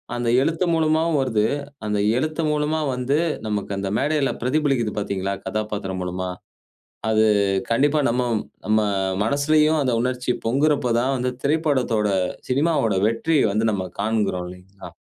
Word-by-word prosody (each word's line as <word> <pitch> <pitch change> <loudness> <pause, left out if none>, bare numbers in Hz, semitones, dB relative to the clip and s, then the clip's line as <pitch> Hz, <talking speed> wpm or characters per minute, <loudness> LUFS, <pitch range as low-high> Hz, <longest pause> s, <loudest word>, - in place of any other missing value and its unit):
அந்த 120 -1 -1
எழுத்து 165 +5 0
மூலமாவும் 160 0 +2
வருது. 110 -5 +1 0.4
அந்த 105 -1 0 0.2
எழுத்து 155 +4 -1
மூலமா 150 +1 0 0.2
வந்து, 130 +4 0 0.3
நமக்கு 105 -1 -3
அந்த 100 0 -2
மேடையில 150 -2 +1
பிரதிபலிக்குது 130 -4 0
பார்த்தீங்களா, 100 -1 -2
கதாபாத்திரம் 105 -3 -3
மூலமா. 90 +1 -3 0.8
அது 110 0 +4 0.5
கண்டிப்பா 145 +6 +3
நம்ம 125 +2 +1 0.4
நம்ம 110 0 +2 0.5
மனசுலயும் 150 +5 +2
அந்த 130 -3 +1
உணர்ச்சி 125 0 -1
பொங்குறப்போ 135 +1 +2
தான் 135 +2 0
வந்து, 125 +1 -1
திரைப்படத்தோட 140 -8 +1 0.4
சினிமாவோட 135 -5 +1
வெற்றிய 140 +7 +1
வந்து 110 +1 +1
நம்ம 95 -2 -2 0.2
காண்கிறோம், 105 -4 0
இல்லைங்களா? 90 +2 -12
125 Hz, 130 wpm, -22 LUFS, 105-150 Hz, 0.8 s, அது